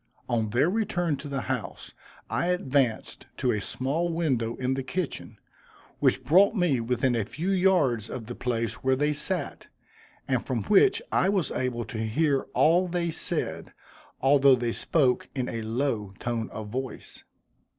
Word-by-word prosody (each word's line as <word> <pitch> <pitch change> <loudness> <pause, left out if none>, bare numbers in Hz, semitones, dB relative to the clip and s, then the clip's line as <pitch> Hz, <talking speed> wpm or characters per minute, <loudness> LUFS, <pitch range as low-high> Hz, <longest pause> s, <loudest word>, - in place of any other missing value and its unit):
On 110 -2 0
their 120 +8 +2
return 180 -6 0
to 140 +2 -8
the 135 -2 -3
house, - - -5 0.3
I 170 - -1
advanced 135 -9 0
to 125 - +1
a 105 - -1
small 150 - -1
window 130 -9 0
in 130 0 -1
the 135 - -2
kitchen, 160 +5 -4 0.6
which - - +2
brought 195 +8 +5
me 175 - +2
within 125 +2 0
a 115 - +1
few 170 - -3
yards 175 - +2
of 125 -3 -6
the 120 - -6
place 115 -2 -3
where 130 0 +3
they 150 +3 +1
sat, 180 +5 -1 0.6
and - - 0
from - - -2
which 410 +3 +4
I 190 - +2
was 190 -7 0
able 125 -2 -2
to 110 - -6
hear 135 +6 0
all 175 +4 +4
they 170 -1 -1
said, - - -2 0.5
although 135 0 +6
they 120 -1 -2
spoke 130 -1 +1
in 130 -2 -1
a 115 - -4
low 110 -3 -2
tone 120 -2 -3
of 110 -1 -7
voice. 130 +3 -6
135 Hz, 160 wpm, -27 LUFS, 120-170 Hz, 0.6 s, although